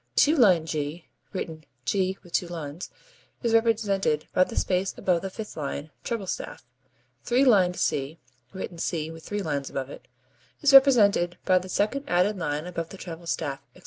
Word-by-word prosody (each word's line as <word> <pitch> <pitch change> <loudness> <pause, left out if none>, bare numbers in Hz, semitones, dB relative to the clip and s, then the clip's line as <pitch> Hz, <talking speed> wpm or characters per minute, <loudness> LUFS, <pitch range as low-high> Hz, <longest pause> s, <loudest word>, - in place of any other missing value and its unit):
Two 305 +3 +5
lined 185 - +5
G, 155 +1 -3 0.3
(written 160 -4 -5 0.2
[2 190 +2 +1
lined - - -32
g 175 - -6
symbol]), 160 -4 -6 0.7
is 230 -1 +1
represented 210 -8 +2
by 185 - +5
the - - -7
space 185 +1 0
above 175 -3 +1
the 195 - -4
fifth 215 +2 -8
line, 145 0 -5
treble 230 -5 -3
staff. 180 - -5 0.6
Three 250 - +3
lined 190 -8 +4
C, 140 +1 -1 0.3
(written 190 -3 -7
[3 165 +5 -3
lined 145 -4 -2
c - - -8
symbol]), 135 0 -5 0.6
is 285 -1 +5
represented 210 -10 +6
by 185 -1 +4
the 185 +1 -9
second 235 +10 0
added 180 +4 +2
line 150 -1 -2
above 170 -2 -4
the 195 - -10
treble 170 -2 -8
staff, 140 -5 -2 0.2
etc. - - -16
180 Hz, 170 wpm, -26 LUFS, 160-205 Hz, 0.7 s, represented